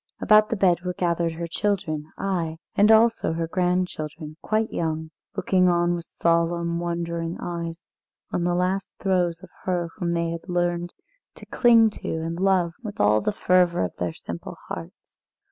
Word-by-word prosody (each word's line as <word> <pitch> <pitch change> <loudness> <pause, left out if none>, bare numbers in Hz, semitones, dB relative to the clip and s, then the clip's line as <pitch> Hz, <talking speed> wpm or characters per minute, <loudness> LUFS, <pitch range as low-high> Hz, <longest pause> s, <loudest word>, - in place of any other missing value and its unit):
About 215 -1 +5
the - - 0
bed 180 -4 +3
were 180 0 -4
gathered 170 -2 0
her 170 +1 -4
children, 170 -4 -1
ay, 170 -5 -2 0.2
and 210 +2 +5
also 225 -5 +4
her 165 0 -2
grandchildren, 165 -4 -2
quite 220 +1 0
young, 160 -1 -2 0.3
looking 185 -1 +3
on 175 0 +2
with 170 -1 -4
solemn, 170 0 0
wondering 170 -1 -3
eyes 170 -1 -5 0.5
on 175 - -1
the 175 0 +1
last 185 +2 -1
throes 180 -3 0
of 190 - -13
her 175 -2 0
whom 175 -4 -1
they 170 0 0
had 170 +3 -7
learned 175 0 0 0.4
to - - -12
cling 230 -3 +5
to - - -7
and 165 +1 -4
love 185 -3 +2
with 215 -3 -7
all 105 +1 +4
the - - 0
fervour 180 - +2
of 90 - -7
their 90 -1 -1
simple 85 +1 -8
hearts. 85 -1 -9
175 Hz, 165 wpm, -24 LUFS, 165-185 Hz, 0.5 s, About